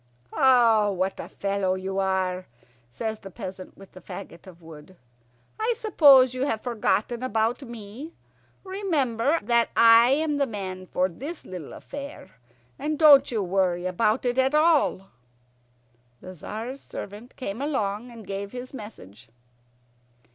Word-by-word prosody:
"Oh, 230 -6 +4
what 190 +1 -2
a - - -7
fellow 195 -1 -1
you 190 +1 -3
are!" 185 -1 -1 0.4
says 220 - -4
the 195 - -10
peasant 190 -2 -9
with 195 -1 -15
the 185 - -13
fagot 170 +1 -10
of 175 -2 -13
wood. 160 +2 -13 0.6
"I 460 +2 +1
suppose 280 - +6
you've 255 -3 -1
forgotten 235 0 -1
about 225 0 0
me. 240 +5 -9 0.5
Remember 320 - 0
that 235 +1 +2
I 230 +1 +7
am 295 +2 +1
the 280 -1 +1
man 185 -4 -6
for 180 +1 +1
this 280 - -8
little 180 -6 -8
affair, 280 -8 -9 0.5
and 305 0 -2
don't 285 -3 +7
you 220 -4 -1
worry 180 -1 0
about 215 +7 0
it 245 +1 +1
at 265 +3 +2
all." 305 - +2 1.1
The 185 - -10
Tzar's 225 - -7
servant 210 +6 -9
came 230 -2 -5
along 240 -6 -2
and 230 -3 -12
gave 200 +2 -5
his 250 +1 -7
message. 115 - -11
225 Hz, 140 wpm, -25 LUFS, 190-265 Hz, 1.1 s, I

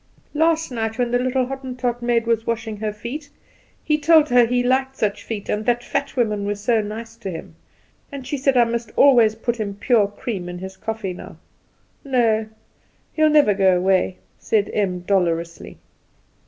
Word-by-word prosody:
Last 320 0 +1
night 225 -2 -3
when 245 -1 0
the 245 - +2
little 255 0 0
Hottentot 250 -2 -4
maid 240 -1 +1
was 230 -1 0
washing 225 -2 -3
her 215 0 -2
feet, 235 +8 -7 0.5
he 305 -1 +1
told 315 0 +5
her 245 -1 +5
he 245 +1 +1
liked 265 +1 +1
such 205 -2 -1
feet, 210 -3 -6
and 210 +1 -1
that 240 0 +1
fat 280 - -3
women 215 -5 0
were 205 +1 -1
so 220 +2 +1
nice 225 +2 -7
to 215 -4 -6
him; 165 -3 -8 0.6
and 275 -2 -7
she 290 - -3
said 270 -1 +1
I 240 - +7
must 230 -1 -3
always 235 -6 +5
put 235 +1 -3 0.2
pure 225 -5 +3
cream 200 -3 -5
in 175 - -6
his 190 +1 -8
coffee 220 -2 -4
now. - - -11 0.7
No; 230 -5 +1 0.7
he'll 310 -1 +3
never 295 -9 +5
go 190 -2 +3
away," 185 0 +1 0.2
said 210 -3 0
Em 185 -4 -1
dolorously. 170 -3 -1
230 Hz, 175 wpm, -21 LUFS, 205-255 Hz, 0.7 s, I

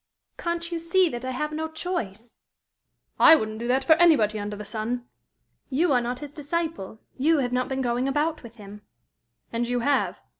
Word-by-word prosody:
"Can't 340 0 -3
you 335 - -2
see 340 +2 +2
that 240 -4 -6
I 260 - -3
have 300 +4 -3
no 315 +1 -3
choice?" 245 - -5 0.8
"I 325 - +9
wouldn't 220 -6 -3
do 235 - -4
that 260 +2 +2
for 315 - +6
anybody 245 -12 +4
under 205 0 -4
the 210 0 -8
sun!" 235 +3 -4 0.6
"You 300 +3 +2
are 250 - +3
not 245 +2 -4
his 295 -2 -7
disciple. 295 - -4 0.2
You 315 +4 +3
have 250 -3 -1
not 250 0 0
been 265 0 -2
going 245 +1 0
about 300 +3 0
with 235 -2 -12
him." 205 -1 -12 0.7
"And 235 +1 -1
you 245 0 -1
have?" 280 +3 +1
260 Hz, 190 wpm, -25 LUFS, 235-320 Hz, 0.8 s, I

